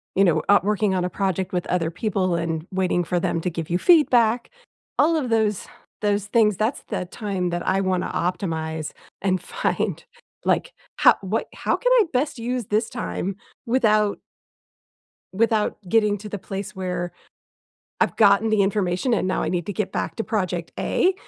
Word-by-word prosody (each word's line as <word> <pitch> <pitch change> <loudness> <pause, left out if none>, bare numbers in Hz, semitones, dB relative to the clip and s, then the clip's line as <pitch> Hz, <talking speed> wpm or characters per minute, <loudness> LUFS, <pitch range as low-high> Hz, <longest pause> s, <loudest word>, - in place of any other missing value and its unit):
you 195 - +5
know, 160 -4 +3
uh, 205 - +7
working 210 -1 +1
on 185 -1 0
a 180 - -1
project 190 0 -2
with 180 -1 -1
other 170 -2 0
people 185 -1 -1
and 165 0 -2
waiting 185 -1 +1
for 175 +1 -1
them 165 -1 -1
to 180 - -1
give 165 -1 -5
you 175 +1 +1
feedback. 245 - +4 0.5
All 330 +3 +4
of 285 -6 -1
those 220 -3 +1 0.4
those 205 -1 0
things, 210 -2 +3
that's 220 +8 -1
the - - -3
time 190 -2 -3
that 175 0 -3
I 190 +1 +2
wanna 185 -1 0
optimize 160 -4 -2 0.3
and 185 -2 +1
find, - - -2 0.4
like, - - +1 0.3
"How - - +6
what 200 +4 -2
how - - 0
can - - 0
I - - +6
best 260 0 0
use 240 -1 -2
this 215 +2 0
time 90 - -3 0.3
without" 215 -4 +2 1.1
without 220 +1 +1
getting 210 0 +3
to 210 +2 -8
the 205 - -5
place 195 +1 -6
where 180 -2 -3 0.9
I've - - +1
gotten 205 +1 +5
the 215 -2 +3
information 195 +3 0
and 200 - +1
now 185 - 0
I - - -1
need 175 -2 -2
to 205 - -3
get 200 +1 -2
back - - -2
to 225 - -2
project 180 -5 -2
A, 370 +1 +2
195 Hz, 180 wpm, -23 LUFS, 180-220 Hz, 1.1 s, uh